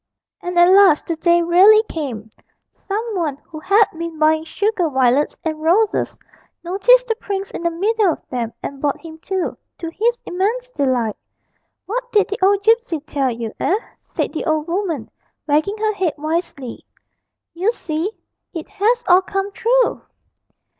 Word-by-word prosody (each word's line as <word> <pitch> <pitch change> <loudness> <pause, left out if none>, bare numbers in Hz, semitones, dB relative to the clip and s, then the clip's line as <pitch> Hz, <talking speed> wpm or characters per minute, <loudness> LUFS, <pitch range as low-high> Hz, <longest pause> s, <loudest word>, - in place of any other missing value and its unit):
And 355 0 -4
at 345 0 +7
last 380 -4 +6
the 335 - -2
day 340 +1 +3
really 385 +6 +6
came; 235 -9 -5 0.4
some 435 +2 -4
one 310 -7 -1
who 315 -2 -9
had 400 +6 +4
been 335 -1 -5
buying 315 +1 +2
sugar 390 -1 0
violets 265 +1 +2
and 315 -1 -3
roses 395 +7 +1 0.5
noticed - - +4
the 460 - 0
prince 395 -3 -5
in - - -6
the 340 - +1
middle 400 +3 +1
of - - -8
them 235 -3 -2
and 275 -1 -6
bought 285 -2 0
him 320 -1 -11
too, 375 +2 -3 0.2
to 330 - -5
his 470 +7 0
immense 450 +8 -2
delight. 255 - 0 0.7
'What 485 +3 -4
did 415 -2 +3
the 410 - -4
old 400 +1 +3
gipsy 450 -6 +2
tell 280 -3 -1
you, 230 -1 -5
eh?' 390 - +2 0.2
said - - -4
the - - -3
old 310 -1 0
woman, 340 - -3 0.3
wagging 310 +8 +1
her 430 0 0
head 375 -6 -1
wisely; 305 -5 -4 0.7
'you 375 +6 +1
see, 335 -2 -3 0.4
it 325 - -5
has 465 +4 +1
all 360 +1 +6
come 390 +1 -3
true!' 480 +3 +1
350 Hz, 160 wpm, -19 LUFS, 310-415 Hz, 0.7 s, at